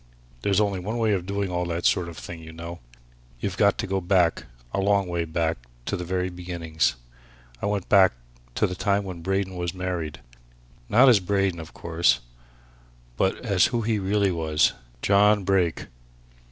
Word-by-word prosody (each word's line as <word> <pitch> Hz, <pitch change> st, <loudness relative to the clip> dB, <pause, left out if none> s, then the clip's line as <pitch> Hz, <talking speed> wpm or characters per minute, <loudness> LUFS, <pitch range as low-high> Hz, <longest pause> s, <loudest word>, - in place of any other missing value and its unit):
There's 100 Hz, -1 st, +2 dB
only 100 Hz, -3 st, +1 dB
one 105 Hz, +6 st, -3 dB
way 110 Hz, -2 st, +2 dB
of 90 Hz, -2 st, -2 dB
doing 100 Hz, -1 st, -2 dB
all 90 Hz, 0 st, -1 dB
that 85 Hz, 0 st, -3 dB
sort 90 Hz, -2 st, +2 dB
of 80 Hz, -, -10 dB
thing, 85 Hz, -2 st, -8 dB
you 80 Hz, 0 st, -10 dB
know. 85 Hz, +1 st, -8 dB, 0.6 s
You've -, -, -3 dB
got -, -, +3 dB
to -, -, -2 dB
go 95 Hz, 0 st, -1 dB
back 90 Hz, -2 st, +2 dB, 0.3 s
a -, -, 0 dB
long 100 Hz, -1 st, +2 dB
way 85 Hz, -1 st, -1 dB
back 80 Hz, -2 st, -1 dB, 0.3 s
to -, -, -1 dB
the 90 Hz, -, -4 dB
very 90 Hz, +1 st, -2 dB
beginnings. 85 Hz, -5 st, -1 dB, 0.7 s
I -, -, -1 dB
went 100 Hz, -3 st, -1 dB
back 95 Hz, -5 st, +6 dB, 0.4 s
to -, -, +2 dB
the 90 Hz, -, -2 dB
time 100 Hz, +2 st, 0 dB
when 90 Hz, -3 st, -7 dB
Braden 95 Hz, +1 st, -1 dB
was 90 Hz, 0 st, -3 dB
married. 90 Hz, -4 st, -3 dB, 0.7 s
Not 125 Hz, +5 st, +6 dB
as 120 Hz, -5 st, +7 dB
Braden, 95 Hz, -2 st, 0 dB
of 80 Hz, +1 st, -10 dB
course 85 Hz, -4 st, +2 dB, 1.0 s
but 95 Hz, -, 0 dB
as 100 Hz, -5 st, +4 dB
who 120 Hz, -2 st, -1 dB
he 110 Hz, -1 st, 0 dB
really 100 Hz, 0 st, +1 dB
was 80 Hz, -3 st, +2 dB, 0.3 s
John 105 Hz, +1 st, +4 dB
Brake. 90 Hz, -3 st, +1 dB
90 Hz, 180 wpm, -25 LUFS, 85-100 Hz, 1.0 s, as